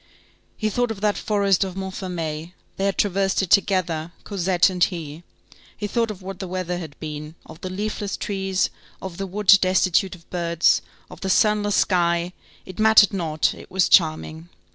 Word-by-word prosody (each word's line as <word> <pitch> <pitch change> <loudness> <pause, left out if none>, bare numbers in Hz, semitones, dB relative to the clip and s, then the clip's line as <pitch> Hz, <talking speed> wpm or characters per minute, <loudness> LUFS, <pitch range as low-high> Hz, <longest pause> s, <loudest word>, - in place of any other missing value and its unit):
He 215 -1 -1
thought 245 +2 0
of 220 -3 -5
that 210 -1 +2
forest 200 -2 +1
of 190 -2 -5
Montfermeil; 180 -4 -5 0.2
they 195 - -1
had 200 - 0
traversed 195 -1 +1
it 185 - -5
together, 175 -5 +2
Cosette 185 -3 +2
and 180 -1 +1
he; 160 -4 -3 0.6
he 210 - -4
thought 230 +2 0
of 200 -3 -8
what 190 0 -7
the 190 - -5
weather 180 -1 -3
had 155 -5 -9
been, 150 0 -7
of 160 - -13
the 185 - -4
leafless 205 +1 -3
trees, 195 -2 -1 0.3
of 185 -3 -7
the 195 0 -4
wood 195 +1 +5
destitute 185 0 +2
of 170 -2 -20
birds, 170 -2 +2 0.3
of - - -12
the 190 - -2
sunless 205 +1 +2
sky; 170 -1 +1 0.3
it 185 - -10
mattered 215 -2 +6
not, 160 -5 0
it - - -13
was 190 -1 +2
charming. 160 -1 +2
185 Hz, 175 wpm, -23 LUFS, 170-200 Hz, 0.6 s, mattered